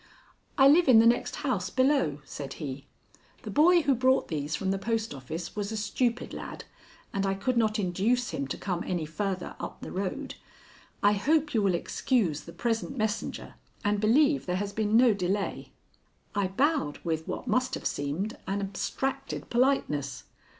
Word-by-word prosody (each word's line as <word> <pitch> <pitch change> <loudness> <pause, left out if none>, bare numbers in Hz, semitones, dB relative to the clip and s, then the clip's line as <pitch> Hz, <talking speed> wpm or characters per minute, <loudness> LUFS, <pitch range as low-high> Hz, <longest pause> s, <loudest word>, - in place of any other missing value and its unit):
"I 270 -1 +7
live 320 +4 +6
in 245 - +8
the 225 - +7
next 235 +1 +2
house 200 -9 -1
below," 255 - +2
said 140 0 -6
he. 140 -2 -6 0.6
"The - - -5
boy 340 +3 +5
who 280 -1 +3
brought 260 +1 +2
these 150 -1 -2
from 190 0 -1
the 195 - -1
post 225 0 -1
office 155 +6 -6
was 205 0 -3
a 220 - -3
stupid 235 +3 -1
lad, - - -7 0.5
and 195 - 0
I 195 0 +1
could 245 +6 -1
not 220 -2 +2
induce 210 +6 0
him 140 - -3
to - - -4
come 180 -3 -3
any 175 -3 -2
farther 185 +4 -3
up - - -7
the - - -7
road. 200 +9 -3 0.7
I 205 - +6
hope 295 +8 +1
you 225 - +3
will 195 -3 +2
excuse 175 - 0
the 170 - -9
present 235 +6 -2
messenger 215 -1 -2 0.3
and 205 0 +2
believe 280 +6 +3
there 180 - 0
has 200 +1 -3
been 215 +1 +2
no 240 -2 +6
delay." 195 +1 -2 0.6
I 200 -2 +1
bowed 255 - +1
with 160 -2 -2
what - - -4
must 255 0 +1
have - - -8
seemed 150 +10 -2
an 195 +1 -1
abstracted 265 +7 -3
politeness. 240 - +1
210 Hz, 175 wpm, -28 LUFS, 180-255 Hz, 0.7 s, in